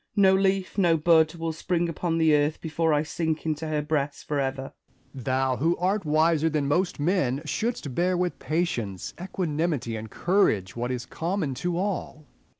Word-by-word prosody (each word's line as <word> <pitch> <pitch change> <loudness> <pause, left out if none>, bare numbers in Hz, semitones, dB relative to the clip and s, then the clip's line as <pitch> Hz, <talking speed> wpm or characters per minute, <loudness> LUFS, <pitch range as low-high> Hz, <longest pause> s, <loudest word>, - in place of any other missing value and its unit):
No 195 -2 +5
leaf, 190 0 +1
no 170 -4 +4
bud, 160 0 +4
will 165 -1 -3
spring 170 +2 -1
upon 165 0 -2
the 160 -2 +4
earth 150 +1 +2
before 160 0 0
I 150 0 +2
sink 160 0 -2
into 155 0 -2
her 150 -1 -1
breast 145 -2 -2
for 145 -1 0
ever. 135 0 -3 0.4
Essex. 130 -4 -9
Thou, 130 0 +1
who 165 +5 +1
art 190 +2 0
wiser 160 +1 +3
than 150 -2 0
most 175 +5 0
men, 145 -4 +1
shouldst 150 - -2
bear 180 +6 +1
with 180 0 -1
patience, 120 - -2
equanimity, 160 -9 -2
and 110 0 -6
courage 110 - +1
what 120 +1 -2
is 125 -1 -3
common 170 -4 -2
to 175 -1 -1
all. 180 -5 -3
160 Hz, 175 wpm, -26 LUFS, 145-175 Hz, 0.4 s, No